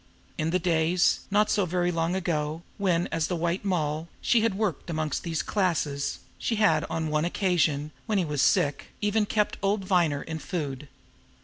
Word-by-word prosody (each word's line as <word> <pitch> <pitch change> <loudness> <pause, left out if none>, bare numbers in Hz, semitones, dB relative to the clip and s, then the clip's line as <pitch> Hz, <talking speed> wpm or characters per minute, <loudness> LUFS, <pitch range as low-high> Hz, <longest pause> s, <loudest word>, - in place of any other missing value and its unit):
In 155 +1 -1
the 180 - +2
days 170 0 +2
not 210 +1 +3
so 200 -3 +2
very 175 +1 +1
long 165 +1 0
ago 160 -3 -2 0.2
when, 180 -3 +2
as 165 -1 0
the 180 - -1
White 170 +3 -1
Moll, 160 -4 -1
she 235 - +3
had 225 -3 +1
worked 195 -6 -2
amongst 155 -3 -1
these 165 -2 -2
classes, 160 -8 0 0.2
she 230 - 0
had 205 -8 +3
on 160 -1 -2
one 150 0 +1
occasion, 160 -5 +1 0.2
when 215 -2 +1
he 185 - +2
was 150 -3 -1
sick, 145 -7 +2
even 210 0 +1
kept 210 0 0
old 195 0 0
Viner 170 -7 +2
in 160 -1 -5
food. 150 -5 -4
170 Hz, 180 wpm, -27 LUFS, 155-195 Hz, 0.2 s, not